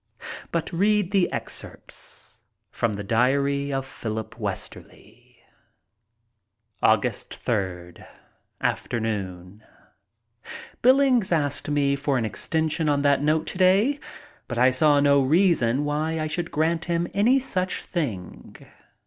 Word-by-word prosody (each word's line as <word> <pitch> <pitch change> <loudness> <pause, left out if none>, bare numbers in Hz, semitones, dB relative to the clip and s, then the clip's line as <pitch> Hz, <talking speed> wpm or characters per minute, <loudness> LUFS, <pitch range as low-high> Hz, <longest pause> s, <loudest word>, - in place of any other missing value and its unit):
But 170 0 -2
read 205 +1 +2
the 195 -3 +2
excerpts - - -5 0.3
from 115 -2 -1
the 100 0 -5
diary 140 +6 +1
of 135 -1 -2
Philip 110 -4 -6
Westerly. - - -7 1.4
ug. - - +4
3rd. 90 -6 -4 0.5
Afternoon: 100 -4 -3 1.2
Billings 255 -5 +4
asked 145 -4 0 0.3
for 140 -1 0
an 115 - 0
extension 160 - 0
on 140 -1 +1
that 140 -1 +3
note 155 +2 +1
today, 195 +10 +2 0.5
but 120 - -5
I 125 +2 +5
saw 145 +2 +4
no 140 0 +4
reason 145 -4 +2
why 155 +2 -1
I 155 - -1
should 165 +2 -3
grant 160 +2 0
him 170 0 0
any 225 +7 +4
such 185 -8 -2
thing. 115 - -5
145 Hz, 110 wpm, -24 LUFS, 120-175 Hz, 1.4 s, I